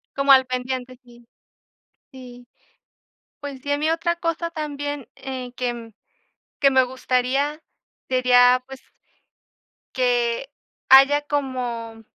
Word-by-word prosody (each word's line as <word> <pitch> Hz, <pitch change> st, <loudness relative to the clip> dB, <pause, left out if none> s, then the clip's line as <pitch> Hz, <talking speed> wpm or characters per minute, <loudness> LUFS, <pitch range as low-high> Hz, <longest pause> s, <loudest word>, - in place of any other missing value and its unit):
Como 275 Hz, 0 st, +2 dB
al 260 Hz, -1 st, +5 dB
pendiente, 255 Hz, 0 st, -4 dB
sí, 240 Hz, -1 st, -19 dB, 0.9 s
sí. 250 Hz, -2 st, -13 dB, 1.0 s
Pues 285 Hz, -2 st, -8 dB
sí, 285 Hz, -, -6 dB
a -, -, +2 dB
mí 310 Hz, +2 st, 0 dB
otra 335 Hz, +1 st, -1 dB
cosa 335 Hz, 0 st, -3 dB
también, 290 Hz, -3 st, -5 dB
eh, 260 Hz, -2 st, -7 dB
que 240 Hz, -2 st, -4 dB, 0.7 s
que 275 Hz, -1 st, +5 dB
me 265 Hz, -1 st, +4 dB
gustaría, 260 Hz, +4 st, -1 dB, 0.5 s
sería, 250 Hz, -1 st, +4 dB
pues, 270 Hz, 0 st, -11 dB, 1.1 s
que 245 Hz, +1 st, 0 dB, 0.4 s
haya 275 Hz, +2 st, +7 dB
como 250 Hz, -6 st, -4 dB
260 Hz, 110 wpm, -22 LUFS, 250-285 Hz, 1.1 s, haya